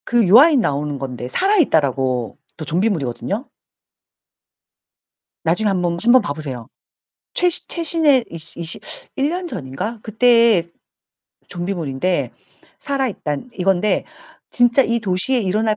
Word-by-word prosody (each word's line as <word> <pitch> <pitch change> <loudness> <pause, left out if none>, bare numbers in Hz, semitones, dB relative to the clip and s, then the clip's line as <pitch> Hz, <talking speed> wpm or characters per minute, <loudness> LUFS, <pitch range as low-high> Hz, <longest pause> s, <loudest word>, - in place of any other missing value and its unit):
그 240 -1 +2
유아인 260 - +7
나오는 145 -5 -2
건데 125 -2 -6
살아있다라고 140 - +1 0.2
또 155 - -6
좀비물이거든요? 180 - -2 1.9
나중에 175 +7 +1
한번 175 -3 0
한번 240 +2 +6
봐 145 - -3
보세요. 135 -7 -7 0.7
최시 355 -2 +2
최신혜 320 -6 +2
이시 165 0 -10
이시 170 0 -6 0.4
1 280 0 +1
년 360 +1 -3
전인가 180 - -5
그때 230 -3 +4 0.9
좀비물인데 175 -2 -2 0.5
살아있단 255 - -3
이건데 190 +2 +1 0.5
진짜 245 +2 +4
이 235 -2 0
도시에 205 +5 0
일어날 215 +2 0
195 Hz, 265 characters per minute, -19 LUFS, 155-245 Hz, 1.9 s, 유아인